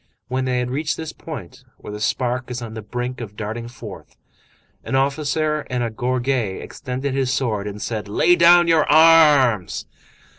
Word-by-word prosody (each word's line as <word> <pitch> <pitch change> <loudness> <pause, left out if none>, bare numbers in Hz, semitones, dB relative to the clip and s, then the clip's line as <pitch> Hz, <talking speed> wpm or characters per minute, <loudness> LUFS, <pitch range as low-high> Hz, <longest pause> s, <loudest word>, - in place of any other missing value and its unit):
When 130 +1 -1
they 125 -1 0
had 125 0 -2
reached 150 +3 -2
this 160 -1 -6
point 130 - -9
where 105 - -9
the 105 - -6
spark 125 +3 -1
is 125 -1 -4
on 115 -2 -7
the 110 - -6
brink 125 +3 -5
of 105 -3 -8
darting 110 +2 -5
forth, 120 - -11 0.7
an - - -3
officer 150 +3 0
in 125 -1 -1
a 115 - -2
gorget 125 -2 -1
extended 130 0 -5
his 135 -2 0
sword 110 -6 -1
and 105 0 -6
said:— 110 -1 -4
"Lay 140 +12 +3
down 175 0 +6
your 165 -2 +4
arms!" 150 - +5
125 Hz, 175 wpm, -21 LUFS, 115-145 Hz, 0.7 s, down